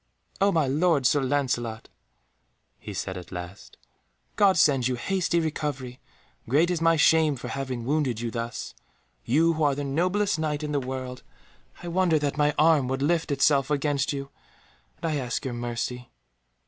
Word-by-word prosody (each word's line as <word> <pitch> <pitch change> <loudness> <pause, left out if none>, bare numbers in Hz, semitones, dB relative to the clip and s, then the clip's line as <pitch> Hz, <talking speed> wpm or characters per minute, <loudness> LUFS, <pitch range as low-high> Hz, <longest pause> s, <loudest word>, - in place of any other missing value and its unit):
"Oh, 200 +1 +4
my 160 -4 +2
lord 145 +1 +2
Sir 145 +3 +3
Lancelot," 125 -5 -1 0.9
he - - -8
said 95 - -4
at 90 -1 -10
last, 90 +2 -9 0.6
"God 195 -3 +4
send 135 -7 +4
you 130 - -1
hasty 175 +6 0
recovery; 145 -5 -3 0.5
great 160 +7 +3
is 170 -2 -1
my 165 0 +4
shame 160 -1 +4
for 120 - -7
having 130 -4 -4
wounded 135 -5 0
you 120 -1 -3
thus, 115 0 -5 0.5
you 165 +7 +3
who 160 - -4
are 145 -2 +3
the 145 - -3
noblest 180 +7 0
Knight 155 -1 -2
in 150 - -3
the 145 - +1
world. 130 -1 -5 0.6
I - - -6
wonder 175 -2 +2
that 145 -2 -1
my 150 -1 +2
arm 155 -4 +4
would 135 +1 -2
lift 165 +2 +1
itself 140 0 +3
against 145 -1 0
you, 140 -1 -5 0.7
and - - -7
I 150 - 0
ask 125 -1 -3
your 130 - -3
mercy." 120 +1 -4
145 Hz, 170 wpm, -26 LUFS, 125-160 Hz, 0.9 s, Oh